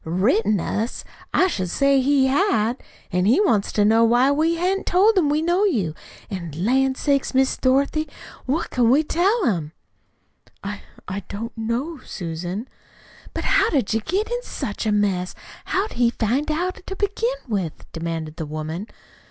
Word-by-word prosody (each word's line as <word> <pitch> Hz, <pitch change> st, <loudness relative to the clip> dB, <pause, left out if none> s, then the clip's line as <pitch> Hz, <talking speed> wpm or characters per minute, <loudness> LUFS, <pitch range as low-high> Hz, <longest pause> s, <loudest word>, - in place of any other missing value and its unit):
"Written 205 Hz, +4 st, +2 dB
us! 220 Hz, +7 st, -2 dB, 0.3 s
I -, -, +4 dB
should 185 Hz, -, -1 dB
say 275 Hz, +5 st, +3 dB
he 275 Hz, 0 st, +3 dB
had! 265 Hz, -, +1 dB, 0.3 s
An' 180 Hz, +1 st, +1 dB
he 240 Hz, -, +4 dB
wants 225 Hz, -, +2 dB
to 205 Hz, -, +3 dB
know 225 Hz, +2 st, +5 dB
why 240 Hz, +4 st, +4 dB
we 320 Hz, +4 st, +2 dB
hain't 370 Hz, +3 st, -1 dB
told 405 Hz, +5 st, +4 dB
him 335 Hz, -6 st, +3 dB
we 300 Hz, +2 st, +1 dB
know 350 Hz, +4 st, +2 dB
you. 215 Hz, -, +1 dB, 0.3 s
An', 175 Hz, -7 st, -6 dB
lan' 260 Hz, +9 st, +2 dB
sakes, 275 Hz, -1 st, 0 dB
Miss 265 Hz, 0 st, +3 dB
Dorothy, 280 Hz, +4 st, +1 dB, 0.4 s
what 295 Hz, +6 st, -1 dB
can 240 Hz, -3 st, +3 dB
we 280 Hz, +5 st, +5 dB
tell 385 Hz, +8 st, +1 dB
him?" 165 Hz, -, -1 dB, 0.9 s
"I 200 Hz, 0 st, -5 dB, 0.3 s
I 190 Hz, +1 st, -3 dB
don't 225 Hz, +3 st, -6 dB
know, 240 Hz, +8 st, -3 dB
Susan." 175 Hz, +3 st, -5 dB, 0.7 s
"But -, -, -3 dB
how'd 255 Hz, -8 st, +2 dB
you 225 Hz, -, +1 dB
get 390 Hz, -, -1 dB
in 485 Hz, 0 st, -1 dB
such 215 Hz, -, -4 dB
a -, -, +2 dB
mess? 195 Hz, -3 st, 0 dB, 0.3 s
How'd 390 Hz, +3 st, -1 dB
he 240 Hz, -1 st, +3 dB
find 240 Hz, +6 st, -1 dB
out 355 Hz, +4 st, -2 dB
to 385 Hz, -, -4 dB
begin 450 Hz, +5 st, -1 dB
with?" 195 Hz, -8 st, -3 dB
demanded 165 Hz, -1 st, -4 dB
the 160 Hz, -, -4 dB
woman. 155 Hz, +6 st, -5 dB
245 Hz, 165 wpm, -22 LUFS, 200-315 Hz, 0.9 s, know